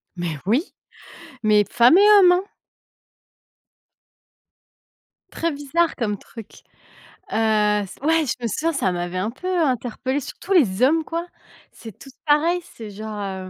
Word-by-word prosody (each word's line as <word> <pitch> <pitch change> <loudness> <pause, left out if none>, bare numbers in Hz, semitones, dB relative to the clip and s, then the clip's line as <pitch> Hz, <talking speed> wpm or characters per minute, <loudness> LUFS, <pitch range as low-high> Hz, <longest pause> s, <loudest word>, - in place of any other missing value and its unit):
Mais 175 -3 -4
oui, 245 - -1 0.7
mais 210 -1 +4
femmes 245 +9 +5
et 415 +1 +6
hommes 360 -2 +6
hein! 365 +2 +1 2.9
Très 335 0 -2
bizarre 300 +4 -1
comme 210 -5 -2
truc. 225 +2 -13 0.7
Heu, - - -3 0.5
c' 190 - -14
ouais, 320 0 +2
je 250 - -1
me - - 0
souviens, 320 - -2
ça 275 -10 0
m'avait 175 0 -4
un 200 +5 -2
peu 310 +9 -9
interpellé 260 0 -1
surtout 360 +7 -5
les 235 - +3
hommes 315 +5 +3
quoi. 335 +2 -4 0.5
C'est 225 -5 -12
tous 270 - -14
pareil, 320 +4 +2
c'est 225 -10 -11
genre, 215 +1 -7
heu, 190 -2 -6
255 Hz, 140 wpm, -21 LUFS, 210-325 Hz, 2.9 s, et